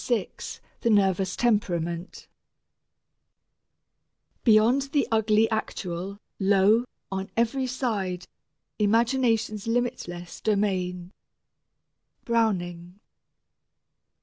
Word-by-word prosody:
VI 235 -6 0 0.5
THE 235 - 0
NERVOUS 190 -3 +2
TEMPERAMENT 175 -7 -1 2.2
Beyond 225 +4 +5
the 290 - +2
ugly 220 0 +3
actual, 195 -3 -3 0.2
lo, 200 +4 +4 0.3
on 190 0 -3
every 255 +3 +1
side, 205 -8 -2 0.5
Imagination's 225 -1 +1
limitless 230 -8 -3
domain. 185 -4 -1 1.1
BROWNING. 180 -6 -1
210 Hz, 70 wpm, -26 LUFS, 185-230 Hz, 2.2 s, Beyond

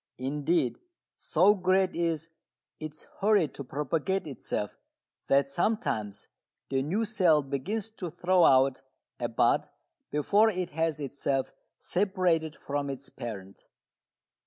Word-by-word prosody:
Indeed 140 +1 0 0.4
so 185 +6 +4
great 185 -1 +2
is 165 -1 -1 0.5
its 155 -1 -7 0.2
hurry 205 -5 +4
to 140 - -8
propagate 150 +8 -1
itself 125 -7 -4 0.5
that 140 0 +4
sometimes 140 - -1 0.4
the 135 -1 +2
new 190 +11 0
cell 180 -8 +3
begins 195 - -3
to 185 -5 -6
throw 180 +2 +2
out 135 -1 +5 0.4
a - - 0
bud - - +2 0.4
before 205 +9 +3
it 185 -4 -3
has 160 -1 -1
itself 140 -1 -2 0.2
separated 180 -5 0
from 145 0 -3
its 135 0 -6
parent. 100 -5 -8
155 Hz, 115 wpm, -29 LUFS, 140-185 Hz, 0.5 s, out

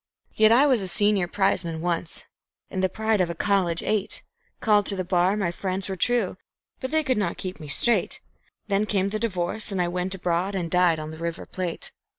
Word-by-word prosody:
Yet 215 0 +5
I 255 +5 +6
was 260 -7 +3
a 190 - -3
senior 200 0 +2
prizeman 175 -4 0
once, 170 0 -2 0.5
and 190 - -2
the 190 - +2
pride 220 +1 0
of 175 - +1
a 170 - -4
college 180 -3 +1
eight; 210 -1 -1 0.4
Called 210 -2 +4
to 200 - +4
the 185 - -2
bar 180 +2 +2
my 190 -5 0
friends 185 +1 -2
were 190 - -3
true! 225 0 0 0.4
but 260 - -4
they 315 +2 +1
could 255 -6 +1
not 175 -4 -1
keep 185 -1 -6
me 155 - -8
straight; 235 - +2 0.5
Then 205 +1 +1
came 195 -2 +1
the 215 +1 -3
divorce, 205 -1 -1
and 195 - -2
I 175 - +2
went 180 +2 -2
abroad 180 +2 -1
and 170 -3 -3
"died" 180 -2 +4
on 155 0 -6
the 160 - -10
River 170 +1 -4
Plate. 180 -3 -4
190 Hz, 210 wpm, -25 LUFS, 175-210 Hz, 0.5 s, I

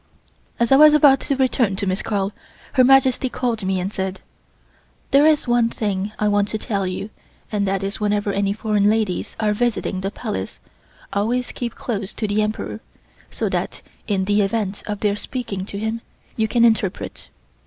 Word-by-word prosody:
As 235 +1 +1
I 270 - +8
was 305 +1 +8
about 280 -3 +6
to 280 - -1
return 250 -6 +1
to 200 - -2
Miss 190 +1 -1
Carl, 200 -2 -1 0.4
Her 255 - +5
Majesty 260 0 +4
called 240 -4 -2
me 190 0 0
and 190 +3 -3
said: 190 0 -3 0.9
"There 280 +3 +6
is 305 -4 +3
one 240 -1 +3
thing 205 -2 -2
I 210 - +1
want 205 -1 +2
to 215 - -3
tell 200 -4 -2
you 185 +3 -5 0.4
and 205 -2 0
that 195 0 -1
is 195 +1 -3
whenever 205 -1 0
any 200 0 +1
foreign 210 -1 +1
ladies 215 -4 -1
are 215 -1 +2
visiting 210 -4 -1
the 195 - -1
Palace, 95 - -5 0.6
always 235 +5 0
keep 235 -2 -5
close 205 -5 -4
to 215 - -2
the 205 +1 +1
Emperor 215 +1 -3 0.5
so - - -2
that - - -3 0.2
in 195 -3 0
the 205 +1 +2
event 205 -1 -1
of 210 -1 -4
their 205 -1 +2
speaking 205 -5 -5
to 200 - -6
him 220 +2 -2 0.3
you 220 -1 +1
can 235 +1 +3
interpret." 215 -5 -1
210 Hz, 185 wpm, -21 LUFS, 200-235 Hz, 0.9 s, I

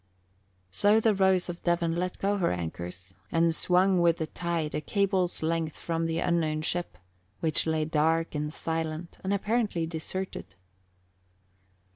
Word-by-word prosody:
So 205 - +4
the 220 -1 +3
Rose 190 -2 +3
of 175 -1 -6
Devon 170 -1 +1
let 180 +1 -2
go 200 +1 0
her 180 - +1
anchors 90 +2 -5 0.2
and 165 0 +3
swung 180 +2 +3
with 170 -1 +4
the 160 - -2
tide 165 -2 -3
a - - -1
cable's 190 -1 0
length 160 -1 -1
from 165 -1 -2
the 165 0 -1
unknown 160 -3 0
ship, 175 +2 -1 0.4
which 160 0 +1
lay 160 -1 +1
dark 160 +1 +1
and 150 0 -2
silent 160 +1 -3
and 190 - -1
apparently 205 -3 0
deserted. 160 - -4
165 Hz, 145 wpm, -28 LUFS, 155-185 Hz, 0.4 s, So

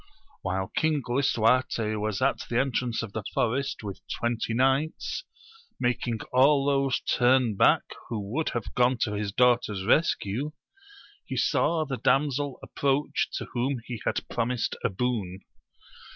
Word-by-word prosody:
While 95 0 -2
King 155 -3 +1
Lisuarte 120 -3 +2
was 105 +1 -2
at 135 - +2
the 120 - 0
entrance 125 -3 0
of 105 -3 -7
the 110 - -3
forest 130 +1 0
with 100 -2 -6
twenty 120 -1 -2
knights, 135 - 0 0.5
making 125 -2 -1
all 135 +2 +5
those 140 -2 +1
turn 125 -3 +3
back - - +4 0.3
who 115 -2 -2
would 160 +3 0
have 120 - -4
gone 125 +1 +3
to 105 - +1
his 105 -1 -2
daughter's 120 -4 +2
rescue, 135 +1 +1 0.7
he - - -5
saw 160 -2 +2
the 135 -3 -3
damsel 140 +1 +1
approach 140 +1 0
to - - -3
whom 130 +2 0
he 120 -3 -6
had - - -2
promised 120 0 -1
a - - +2
boon. 95 -3 -2
125 Hz, 140 wpm, -27 LUFS, 110-135 Hz, 0.7 s, all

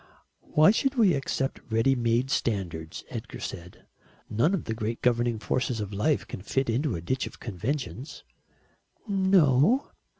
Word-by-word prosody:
"Why 155 +5 +7
should 270 +5 0
we 215 -8 +5
accept 135 -1 -2
ready 115 +4 +3
made 120 +1 +1
standards?" 85 -8 -2
Edgar - - -6
said. 90 +1 -8 0.5
"None 120 - +3
of 180 - -4
the 110 - -3
great 110 +1 -4
governing 120 -1 +2
forces 125 +2 -1
of 105 -1 -4
life 110 +9 +1
can - - -7
fit 125 +5 0
into 130 +3 0
a 85 - -5
ditch 130 +10 -1
of - - -12
conventions." 125 - -4 0.8
"No." 190 - +3
125 Hz, 145 wpm, -27 LUFS, 110-150 Hz, 0.8 s, Why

